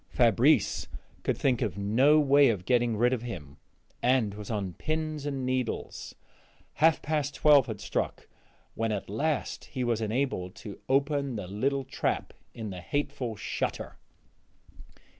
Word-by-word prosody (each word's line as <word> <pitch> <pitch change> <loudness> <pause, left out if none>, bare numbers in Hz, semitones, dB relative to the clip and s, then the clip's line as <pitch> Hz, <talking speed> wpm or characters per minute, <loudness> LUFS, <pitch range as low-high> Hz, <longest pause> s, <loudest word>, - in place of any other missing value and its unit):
Fabrice - - +3 0.3
could - - -1
think 130 -3 +1
of 105 -6 -1
no 125 +10 +4
way 140 -1 +5
of 100 -6 -2
getting 120 -2 +2
rid 120 +3 +3
of 125 - -1
him, 80 -12 -7 0.4
and 125 -5 +2
was 105 0 -8
on 100 -5 -2
pins 155 - -3
and 135 -3 -2
needles; 130 -2 -3 0.7
half 160 0 +4
past 150 -1 -1
twelve 145 -4 +5
had 110 -3 -5
struck - - -3 0.5
when 115 0 -1
at 100 -2 -4
last 150 +7 -1
he 130 - -4
was 120 -2 0
enabled 110 -5 -1
to 105 -3 -9
open 140 -1 +1
the 105 -3 -4
little 135 +9 -1
trap - - -2 0.2
in 110 -3 -6
the 90 -1 -7
hateful 135 0 -2
shutter. - - -4
125 Hz, 145 wpm, -29 LUFS, 105-140 Hz, 0.7 s, way